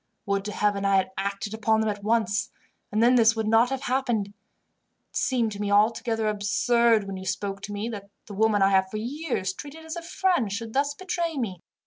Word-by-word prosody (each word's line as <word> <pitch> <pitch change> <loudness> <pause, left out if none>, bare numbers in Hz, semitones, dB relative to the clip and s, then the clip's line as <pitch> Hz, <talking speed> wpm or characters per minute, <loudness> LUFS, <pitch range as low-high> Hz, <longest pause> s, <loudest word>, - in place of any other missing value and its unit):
Would 200 0 -1
to 210 - -3
Heaven 205 -1 0
I 195 0 +3
had 190 -1 +1
acted 200 +2 -3
upon 220 0 +1
them 220 0 +1
at 205 -1 -8
once, 220 0 +1 0.4
and 215 +2 +2
then 245 +2 +6
this 230 -2 +5
would 220 -1 -2
not 225 +2 +4
have 270 0 -3
happened. 245 -6 0 0.8
It - - -23
seemed 240 -4 +1
to 205 0 -6
me 205 - -1
altogether 225 +2 +2
absurd, 215 +2 +2
when 195 -1 -6
you 190 - -8
spoke 195 +1 -3
to 205 - -7
me, 205 +2 -3
that 200 -3 -7 0.2
the 205 - -9
woman 210 0 +3
I 195 - +5
have 190 -1 +3
for 215 - -5
years 240 - -3
treated 295 +9 -10
as 320 +1 -5
a 340 - -5
friend 335 - 0
should 225 +2 -5
thus 285 +1 +1
betray 340 -2 -3
me. 195 -9 -3
220 Hz, 215 wpm, -26 LUFS, 200-240 Hz, 0.8 s, then